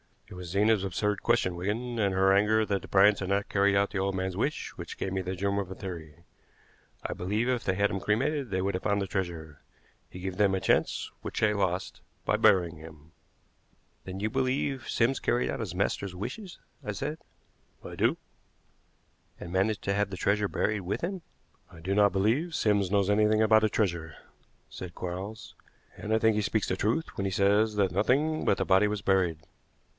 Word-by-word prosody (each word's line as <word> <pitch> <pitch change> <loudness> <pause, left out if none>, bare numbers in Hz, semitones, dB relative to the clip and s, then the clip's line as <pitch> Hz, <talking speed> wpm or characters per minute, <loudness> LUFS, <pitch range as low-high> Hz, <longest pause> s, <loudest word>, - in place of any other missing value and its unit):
It - - -10
was 90 -1 -8
Zena's 105 +2 +2
absurd 105 +2 -1
question, 115 -7 +1
Wigan, 115 +7 -3
and 100 -3 +1
her 95 +1 +4
anger 110 +2 +3
that 100 -2 -1
the - - -10
Bryants 100 +1 +5
had 95 - -4
not 100 +1 0
carried 100 0 +3
out 100 0 +2
the 100 - -2
old 95 0 -1
man's 95 -1 -2
wish, 140 +8 -1
which - - -7
gave 95 - -3
me 95 0 -1
the 95 +1 -4
germ 100 +2 0
of 95 -2 -4
a 95 - -7
theory. 85 -4 -8 0.8
I - - -2
believe 105 +7 -1
if 125 -2 -1
they 95 - +2
had 100 - -3
had 100 - +3
him 95 - -2
cremated 130 +7 0
they 95 -1 -1
would 100 +1 -1
have 90 - -2
found 100 0 0
the 100 - -2
treasure. 85 -7 -4 0.5
He 90 - -10
gave 95 -1 -4
them 100 -2 +3
a 95 - -2
chance - - +1
which - - -4
they 105 -1 +3
lost 95 -3 -2 0.2
by - - +2
burying 85 -4 +3
him." 80 0 -13 0.9
"Then 95 +1 -6
you 110 - 0
believe 130 +1 -1
Sims 125 +3 +1
carried 120 +1 0
out - - -4
his 100 -6 -4
master's 95 0 -1
wishes?" 180 - -6 0.3
I - - -3
said. - - -4 0.6
"I - - -8
do." - - +2 1.2
"And 85 - -8
managed 100 +3 0
to 100 - 0
have 100 0 0
the 95 - -6
treasure 105 +3 +1
buried 105 +1 -1
with 95 +2 -3
him?" 185 +1 -3 0.5
"I 85 - -14
do 95 +4 -1
not 100 0 +4
believe 120 - +1
Sims 100 -3 +2
knows 100 0 +2
anything 110 +1 +3
about 110 0 +5
a - - +2
treasure," 85 -7 -1 0.5
said 90 -2 -8
Quarles; 95 +5 -6 0.4
"and 105 - -5
I - - +5
think 110 -1 +3
he - - +2
speaks 105 0 0
the 95 - -1
truth 115 +12 -1
when 100 - -1
he 95 - -1
says 100 +3 +3
that 100 -2 +2
nothing 150 +8 +1
but 100 - +3
the - - -1
body 95 +3 +4
was 105 -1 -3
buried. 95 -5 +1
100 Hz, 210 wpm, -28 LUFS, 95-110 Hz, 1.2 s, Bryants